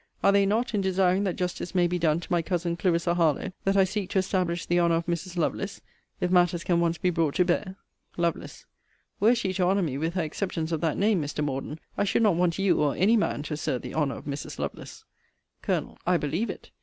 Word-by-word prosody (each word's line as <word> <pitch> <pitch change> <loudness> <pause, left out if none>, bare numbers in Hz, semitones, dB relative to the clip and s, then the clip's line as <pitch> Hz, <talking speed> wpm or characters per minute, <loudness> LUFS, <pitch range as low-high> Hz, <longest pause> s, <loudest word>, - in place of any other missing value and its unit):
Are 200 - +6
they 200 0 +4
not, 230 +4 0
in 205 - +1
desiring 190 +1 +2
that 185 - -1
justice 180 0 -4
may 175 -1 +4
be 175 +1 -1
done 160 -1 +2
to - - -11
my 175 -1 +3
Cousin 170 0 -1
Clarissa 170 0 +1
Harlowe, 170 +1 +1
that 195 +1 +2
I 195 - +6
seek 190 0 -2
to - - -1
establish 185 -3 0
the 175 0 +2
honour 170 -1 +3
of 165 0 -1
Mrs. 175 +1 -3
Lovelace, 165 - -2 0.4
if 180 - 0
matters 175 -2 +3
can 175 -2 +2
once 170 0 +1
be 180 - +1
brought 165 -4 0
to 180 - +3
bear? 185 +2 -1 0.4
Lovel. 170 -1 0 0.7
Were 225 +4 +5
she 195 -6 -1
to 185 0 0
honour 190 +2 +2
me 140 -4 -2
with 165 +3 -2
her 180 - +1
acceptance 160 0 -3
of 160 -2 -1
that 160 -3 0
name, 200 -3 +2
Mr. 150 +1 -3
Morden, 145 +2 -4 0.2
I - - +3
should 205 - +2
not 210 -4 +5
want 175 -1 +1
you 195 -1 +2
or 145 -2 +1
any 205 +6 +4
man 205 -9 0
to 155 - -5
assert 140 -4 -2
the - - -7
honour 145 -5 0
of - - -10
Mrs. 140 0 -5
Lovelace. - - -6 0.6
Col. - - -2
I 180 0 +4
believe 165 +9 -2
it. - - -8
175 Hz, 235 wpm, -27 LUFS, 165-190 Hz, 0.7 s, Are